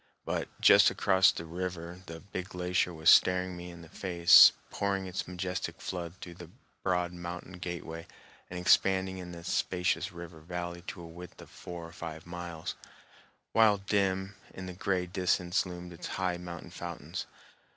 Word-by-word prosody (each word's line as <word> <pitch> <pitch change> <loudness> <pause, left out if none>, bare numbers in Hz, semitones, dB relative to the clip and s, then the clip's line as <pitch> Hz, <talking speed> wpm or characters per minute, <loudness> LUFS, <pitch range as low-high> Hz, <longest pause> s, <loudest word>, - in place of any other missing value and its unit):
But - - -2
just - - +7
across 95 0 +4
the 85 - -6
river 90 +1 -5
the 80 0 -7
"Big 95 -1 -6
Glacier" 90 0 0
was 80 -1 -5
staring 90 0 +4
me 90 0 -8
in 85 -1 -11
the - - -12
face, 85 0 +7 0.2
pouring 100 -1 -1
its 90 -1 -4
majestic 90 -2 -4
flood 85 -2 -5
through 85 -3 -9
a 85 - -9 0.3
broad 90 -1 0
mountain 90 +1 -7
gateway 85 -2 -6 0.4
and 90 - -5
expanding 95 +1 +3
in 90 -1 -7
the 85 -1 -9
spacious 90 0 0
river 85 -2 -9
valley 85 +1 -5
to 90 - -6
a - - -8
width 90 +2 -11
of - - -13
four 85 -1 -8
or 85 - -10
five 80 -2 -7
miles, 85 -2 -6 0.8
while 110 -2 +5
dim 95 -1 0 0.2
in 95 - -6
the 90 - -6
gray 90 0 -1
distance 90 0 0
loomed 90 0 -8
its 85 - -7
high 90 -2 0
mountain 85 -1 -8
fountains. 85 -1 -6
90 Hz, 165 wpm, -30 LUFS, 85-95 Hz, 0.8 s, just